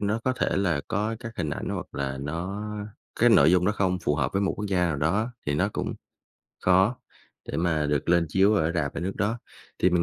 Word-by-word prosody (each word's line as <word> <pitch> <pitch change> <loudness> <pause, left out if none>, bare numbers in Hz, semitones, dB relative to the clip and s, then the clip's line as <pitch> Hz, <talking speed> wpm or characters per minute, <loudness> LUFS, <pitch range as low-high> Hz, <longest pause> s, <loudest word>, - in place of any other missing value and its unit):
nó 105 +2 0
có 130 - +2
thể - - +1
là 90 -7 +1
có 110 +1 -1
các 120 -2 -7
hình 80 -4 -2
ảnh - - -4
hoặc - - -3
là 70 -1 -3
nó 90 +8 -4 0.6
cái 120 0 +6
nội 80 -7 +6
dung 90 0 +4
nó 105 - +3
không 95 -3 0
phù 75 - +2
hợp 70 -4 -1
với 100 +1 +1
một 100 - +1
quốc 105 - -4
gia 95 -2 +1
nào 80 -4 -1
đó 100 - 0
thì 75 - +1
nó 95 +7 +2
cũng - - -3 0.7
khó 95 +6 +4 0.5
để - - -3
mà 80 -3 +1
được 75 +1 -1
lên 85 -1 +4
chiếu 100 +5 +4
ở 80 -4 +1
rạp 75 -5 -1
ở - - -3
nước 95 +3 -3
đó. 110 +4 0 0.4
Thì 90 - +3
mình 85 -1 +3
90 Hz, 240 wpm, -26 LUFS, 80-100 Hz, 0.7 s, cái